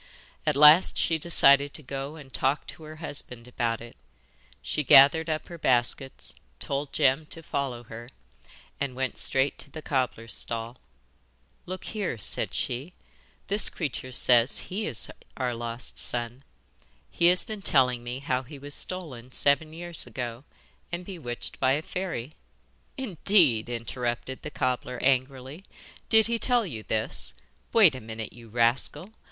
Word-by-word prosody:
At 150 - +2
last 150 +5 +7
she 160 -1 +2
decided 140 -3 +4
to 155 - -6
go 135 +3 -5
and 140 -4 -13
talk 135 +3 0
to - - -10
her 155 0 -9
husband 135 -6 -5
about 115 -2 -2
it. 120 0 -11 0.7
She 150 - -1
gathered 145 +5 +7
up 155 -1 -2
her 170 -1 -10
baskets, 130 +1 0 0.3
told 140 +1 -3
Jem 145 +1 +2
to 165 - -7
follow 135 -5 -3
her, 115 +1 -10 0.7
and 140 -3 -3
went 130 -1 -2
straight 135 +1 +1
to - - -9
the 155 +2 -9
cobbler's 125 -4 -2
stall. 115 +1 -2 0.9
'Look 185 +1 -6
here,' 205 - -3
said 100 - 0
she, 135 +9 -3 0.5
'this 205 +2 +1
creature 135 -5 -4
says 125 +3 +2
he 210 +2 -2
is 120 -7 0 0.3
our 125 -2 -1
lost 115 +1 -4
son. 120 +2 +1 0.7
He 170 - +3
has 180 +1 +3
been 215 -2 -7
telling 125 -8 +2
me 120 +1 -5
how 130 -2 -1
he 140 +3 -11
was 145 +1 -7
stolen 140 -11 -2
seven 145 +4 +2
years 170 -3 -2
ago, 120 +2 -6 0.5
and 175 +1 -4
bewitched 150 -11 -5
by 130 - +3
a 150 +3 -1
fairy.' 160 -8 -5 0.6
'Indeed!' 175 - +3
interrupted 120 +2 -4
the - - -6
cobbler 125 -2 -2
angrily. 130 +4 0 0.5
'Did 220 -1 +7
he 235 0 0
tell 245 -2 +2
you 120 - -6
this? 105 - -1 0.4
Wait 200 -10 +6
a 130 - -7
minute, 110 0 -7
you 115 -1 -14
rascal! 120 - +1
135 Hz, 150 wpm, -27 LUFS, 120-160 Hz, 0.9 s, last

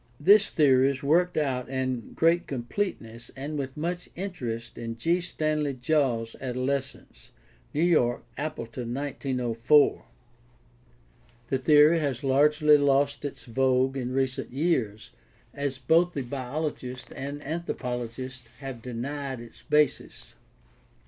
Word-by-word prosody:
This 205 +7 +6
theory 135 -4 +4
is 140 0 -4
worked 175 +5 +2
out 130 -5 -1
in 130 -2 -3
great 165 +1 +2
completeness 120 - -4
and 140 +3 -5
with 135 -1 -4
much 175 +3 -3
interest 125 - -5
in 115 0 -6
G. 165 +9 +1
StsmleyJiaWs 145 -7 0
Adolescence 130 +2 -4 0.4
(New 155 - 0
York: 140 -9 +2
Appleton, 125 -5 -5
1904). 130 -1 +1 1.4
The 135 - +1
theory 150 +4 +6
has 140 -5 -2
largely 150 +2 +4
lost 140 0 +2
its 145 - -6
vogue 130 +2 +2
in 125 -2 -3
recent 130 0 -1
years, 130 -8 -1 0.4
as 140 -2 -2
both 165 +7 +3
the 140 - -3
biologist 130 0 -4
and 140 +2 -5
anthropologist 130 -5 -5
have 135 -4 -7
denied 130 +2 -4
its 115 -1 -12
basis. 150 -2 0
135 Hz, 115 wpm, -27 LUFS, 125-150 Hz, 1.4 s, This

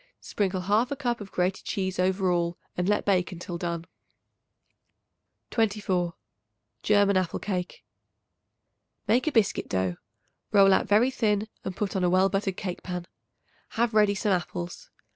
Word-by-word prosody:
Sprinkle 190 -2 -2
1/2 225 +8 +1
cup 240 -5 -1
of 195 - -9
grated 180 +1 -1
cheese 190 -2 -2
over 185 0 +2
all 170 0 0 0.2
and 180 +2 0
let 210 - +1
bake 190 -2 +2
until 175 0 -6
done. 170 -1 -3 1.7
24. 200 -6 0 0.7
German 205 -2 +4
Apple 185 -2 0
Cake. 185 -3 -4 1.2
Make 250 +6 +2
a - - +3
biscuit 225 -7 +1
dough; 95 -2 -1 0.5
roll 195 -2 +6
out - - +2
very 225 +6 +4
thin 210 -4 0 0.2
and 190 - -4
put 200 -3 -2
on 190 - 0
a 180 - +3
well 185 +2 +4
buttered 195 -1 -1
cake 180 -2 -4
pan. 180 -1 -5 0.7
Have 235 0 +1
ready 210 -1 +4
some 205 +1 0
apples. 175 -1 -3
195 Hz, 145 wpm, -27 LUFS, 180-210 Hz, 1.7 s, roll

